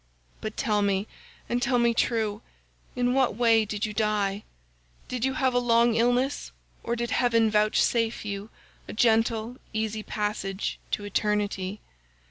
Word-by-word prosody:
But 215 0 -5
tell 210 -5 +1
me, 200 0 +1 0.4
and 240 +1 -1
tell 245 0 +2
me 235 -1 +3
true, 220 -2 0 0.5
in 245 0 +1
what 265 -4 +2
way 225 -1 +4
did 210 +1 -2
you 210 - -4
die? 210 -2 0 0.6
Did 250 -2 -4
you 265 0 +1
have 260 -3 +1
a 245 - +3
long 235 -1 +3
illness, 245 +4 +1 0.3
or 235 - -2
did 235 0 -3
heaven 230 -3 +3
vouchsafe 220 +2 +2
you 200 +1 -5 0.4
a - - -6
gentle 225 +1 +2 0.2
easy 220 0 -1
passage 205 -2 -3
to 205 - -2
eternity? 205 -1 -1
225 Hz, 145 wpm, -27 LUFS, 210-240 Hz, 0.6 s, way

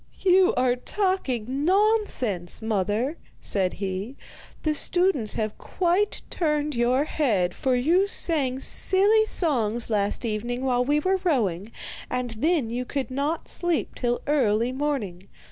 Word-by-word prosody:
'You 375 0 +4
are 250 -1 +2
talking 270 - -2
nonsense, 370 - +1
mother,' 220 - -1 0.2
said 190 -3 0
he. 195 +6 -5 0.5
'The 310 - +1
students 345 - +2
have 215 -1 -2
quite 370 +3 0
turned 300 -3 -1
your 245 +3 +2
head, 215 - 0
for 260 -1 0
you 335 +10 +2
sang 280 -10 +1
silly 410 +9 +3
songs 240 - 0
last 205 +2 0
evening 240 +4 -3
while 250 -1 +2
we 290 +3 +1
were 380 +4 0
rowing, 215 - 0 0.4
and 250 -1 -2
then 265 +1 0
you 245 +1 -2
could 270 +1 -4
not 285 +5 -2
sleep 345 -3 -1
till 240 -1 -2
early 245 -5 +1
morning. 255 -10 -3
260 Hz, 130 wpm, -25 LUFS, 225-330 Hz, 0.5 s, You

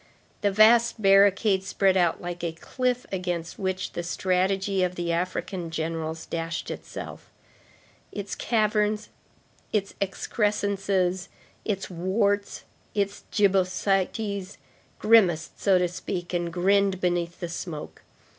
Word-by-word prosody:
The 205 - +3
vast 225 +3 +5
barricade 195 0 +4
spread 195 0 +2
out 175 -3 +2
like 175 0 -6
a 170 -1 -1
cliff 250 +8 -2
against 175 -3 -3
which 190 -1 -2
the - - -4
strategy 190 +2 0
of 180 0 0
the 175 -1 -2
African 175 0 -2
generals 160 0 -3
dashed 165 0 -4
itself. - - -8 0.8
Its 205 -1 -5
caverns, 215 -1 +1 0.6
its 200 -2 -1
excrescences, 195 -2 0 0.4
its 195 -3 -3
warts, 200 +3 0 0.3
its 200 -1 -1
gibbosities, 195 0 +1 0.4
grimaced, 190 -8 +3
so 195 -2 +4
to 180 0 +2
speak, 175 0 -5
and 175 -1 -1
grinned 195 +2 +2
beneath 175 -1 -1
the 175 - -3
smoke. 165 -2 -6
190 Hz, 115 wpm, -26 LUFS, 175-200 Hz, 0.8 s, vast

